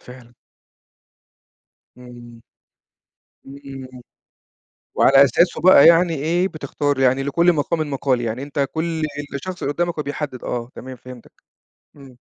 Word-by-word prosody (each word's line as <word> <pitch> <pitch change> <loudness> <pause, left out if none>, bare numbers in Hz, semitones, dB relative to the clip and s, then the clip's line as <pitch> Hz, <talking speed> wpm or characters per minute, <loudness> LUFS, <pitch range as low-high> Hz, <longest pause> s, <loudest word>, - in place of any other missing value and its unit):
فعلًا. 125 -1 -15 1.6
امم. 120 -2 -14 1.1
إمم، 135 -2 -11 0.9
وعلى 135 +1 +6
أساسه 170 +7 +1
بقى 180 -5 +7
يعني 170 0 +5
إيه 170 +6 0
بتختار، 145 -2 -3
يعني 130 +1 +2
لكل 170 +6 +2
مقامِِ 155 0 -2
مَقال، 130 -2 -1
يعني 120 +2 -4
أنت 140 -1 -2
كل 160 0 -3 0.3
الشخص 180 +6 -6
اللي 140 - -1
قدامك 175 0 -1
هو - - -1
بيحدد 145 -2 -6
آه 120 -1 -4
تمام. 130 0 -9
فهمتك، 125 0 -14 0.6
امم. 135 -3 -15
140 Hz, 120 wpm, -20 LUFS, 125-160 Hz, 1.6 s, بقى